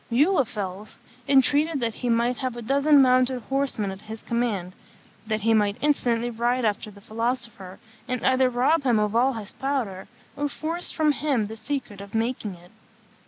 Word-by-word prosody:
Muhlenfels 225 - 0 0.3
entreated 285 +3 +3
that 230 -2 -1
he 245 - -3
might 235 +1 +2
have 255 -3 -3
a - - -5
dozen 280 +3 +5
mounted 255 0 +3
horsemen 270 -7 -1
at 190 +1 -9
his 220 +1 -9
command, 215 -7 -1 0.5
that 215 0 -1
he 225 +2 +3
might 205 -1 +2
instantly 240 -5 +1
ride 240 +2 0
after 215 +1 -1
the 200 -1 -14
philosopher, 230 -4 -4 0.3
and 250 -2 -2
either 260 0 +4
rob 255 +6 +2
him 245 -5 +2
of 210 0 0
all 255 +3 +3
his 215 -4 -7
powder, 250 -9 -3 0.3
or 290 0 -1
force 330 +4 -4
from 310 -2 +2
him 280 -6 0
the 220 +2 -7
secret 225 -3 -5
of 200 +2 -9
making 225 -3 -1
it. 175 +1 -18
240 Hz, 170 wpm, -25 LUFS, 215-270 Hz, 0.5 s, dozen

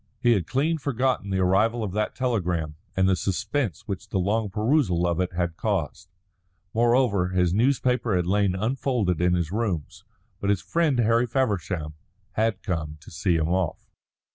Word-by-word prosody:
He 120 -1 +3
had 95 -8 +1
clean 155 +5 0
forgotten 130 -6 0
the 95 - 0
arrival 110 +6 +2
of 100 - -3
that 105 +2 -2
telegram 90 -11 -1 0.2
and 95 0 +4
the 95 - +4
suspense 100 - -2
which 100 +1 -5
the - - -1
long 105 +3 0
perusal 105 - +1
of 85 0 0
it 90 0 -1
had 85 -1 -2
caused. 90 -5 -2 0.6
Moreover, 115 -5 +3
his 90 -2 +1
newspaper 125 -1 +2
had 90 -1 +1
lain 100 0 +2
unfolded 110 - 0
in 90 0 +3
his 85 -2 -1
rooms. 90 -7 -3 0.4
But 100 - -1
his 100 -2 +1
friend 165 -6 +1
Harry 115 +1 +3
Feversham 95 - -1 0.4
had 110 -1 0
come 80 -6 -3
to 75 - -14
see 85 +2 0
him 80 0 0
off. 90 -3 -2
100 Hz, 165 wpm, -25 LUFS, 90-115 Hz, 0.6 s, and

